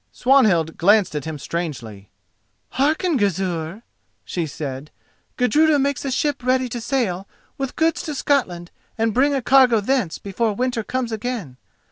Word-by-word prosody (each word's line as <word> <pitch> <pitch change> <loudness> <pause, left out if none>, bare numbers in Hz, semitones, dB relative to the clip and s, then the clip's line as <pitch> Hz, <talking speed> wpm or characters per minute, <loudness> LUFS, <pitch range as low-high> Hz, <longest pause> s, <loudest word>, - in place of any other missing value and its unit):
Swanhild 215 - +3
glanced 200 0 +4
at 150 -2 -4
him 160 -1 -5
strangely. 135 - -5 0.6
"Hearken, 310 +4 +1
Gizur!" 185 -1 -2 0.4
she 170 -3 -3
said: 140 -1 -6 0.5
"Gudruda 300 +5 +3
makes 280 -1 0
a - - -1
ship 275 0 -1
ready 255 0 +1
to 240 0 -5
sail 205 -8 -1 0.3
with 270 -2 -3
goods 325 0 +1
to 300 - -4
Scotland 185 -13 -1 0.3
and 225 -1 +1
bring 280 +4 +3
a 265 - -2
cargo 255 -3 +5
thence 210 -5 0
before 210 +3 -2
winter 245 +1 -1
comes 255 +1 -3
again. 220 - -4
225 Hz, 145 wpm, -21 LUFS, 175-265 Hz, 0.6 s, cargo